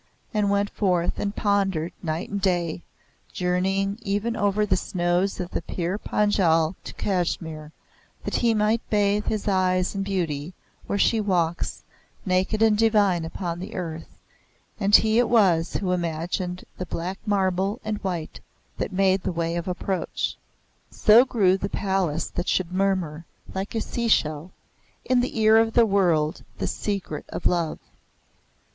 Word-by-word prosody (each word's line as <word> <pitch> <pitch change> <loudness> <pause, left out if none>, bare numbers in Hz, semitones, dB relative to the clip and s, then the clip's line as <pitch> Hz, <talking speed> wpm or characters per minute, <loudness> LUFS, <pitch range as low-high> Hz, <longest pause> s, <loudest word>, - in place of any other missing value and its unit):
and 210 -2 +1
went 200 0 +1
forth 180 -4 0
and 205 0 -2
pondered 195 -5 0
night 160 0 -3
and 200 0 -4
day, 175 -3 0 0.5
journeying 195 +3 0
even 210 +2 -1
over 205 0 +1
the - - +2
snows 180 +1 0
of 180 -1 -4
the - - -2
Pir 175 +3 -3
Panjal 175 -8 +2
to - - -8
Kashmir, 165 -5 -2 0.5
that - - -1
he 230 -2 +2
might 215 +2 +2
bathe 205 0 +1
his 215 -1 -2
eyes 185 -2 +2
in 195 - -2
beauty 175 -4 -2 0.3
where 200 - -1
she 220 +2 +3
walks, 175 -4 -1 0.4
naked 190 +4 +1
and 220 -1 +5
divine, 205 -6 +3
upon 170 0 -4
the 185 - -7
earth, 165 -3 -6 0.6
and 205 0 +5
he 220 +1 +5
it 245 - +2
was 185 -8 +3
who 185 -2 -1
imagined 175 +1 -2
the 185 - -4
black 180 +3 -4
marble 195 +1 +1
and 215 -1 -3
white 175 -4 -4 0.4
that - - -2
made 190 0 +2
the - - -2
way 170 0 -2
of 170 +1 -3
approach. 185 +1 -2 0.5
So 225 +4 +6
grew 195 -7 +3
the 200 +1 -3
palace 190 -7 -1
that 175 - -3
should 180 -2 0
murmur, 185 -5 0 0.3
like 195 +4 -4
a 225 - 0
seashell, 170 -11 0 0.6
in 255 -1 +3
the 245 -2 -1
ear 220 0 +6
of 225 0 +3
the 235 0 +6
world 175 -7 +1
the - - -2
secret 195 -7 -3
of - - -6
love. 170 -3 +1
190 Hz, 150 wpm, -25 LUFS, 175-205 Hz, 0.6 s, So